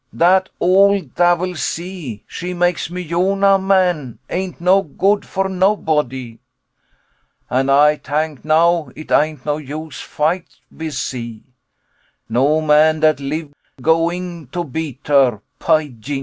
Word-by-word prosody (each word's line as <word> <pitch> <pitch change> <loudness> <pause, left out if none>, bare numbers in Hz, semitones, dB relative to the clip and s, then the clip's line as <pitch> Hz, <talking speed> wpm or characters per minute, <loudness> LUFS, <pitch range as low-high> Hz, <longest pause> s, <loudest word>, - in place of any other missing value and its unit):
Dat 185 +2 +3
ole 195 +2 +4
davil, 175 +1 +2
sea, 165 - -5
she 180 +1 -6
make 175 -2 0
me 180 +1 -5
Yonah 195 +3 +2
man 180 - +1
ain't 185 0 -3
no 185 +3 +4
good 195 +5 0
for 195 0 -2
nobody. 150 - -1 1.1
And 135 +2 +1
Ay 150 +2 +5
tank 150 +1 -3
now 160 0 +2
it 155 - -10
ain't 150 -3 +1
no 150 -1 0
use 155 +1 -7
fight 165 +4 -2 0.2
with 160 -3 -6
sea. 120 -4 -5 0.8
No 140 +7 +2
man 155 +1 +4
dat 155 -2 +3
live 145 +2 -4 0.3
going 165 +1 0
to 175 +7 -4
beat 145 -3 -6
her, 135 -7 +3 0.2
py 155 -3 +1
yingo! 135 +5 -5
160 Hz, 130 wpm, -18 LUFS, 145-180 Hz, 1.1 s, Ay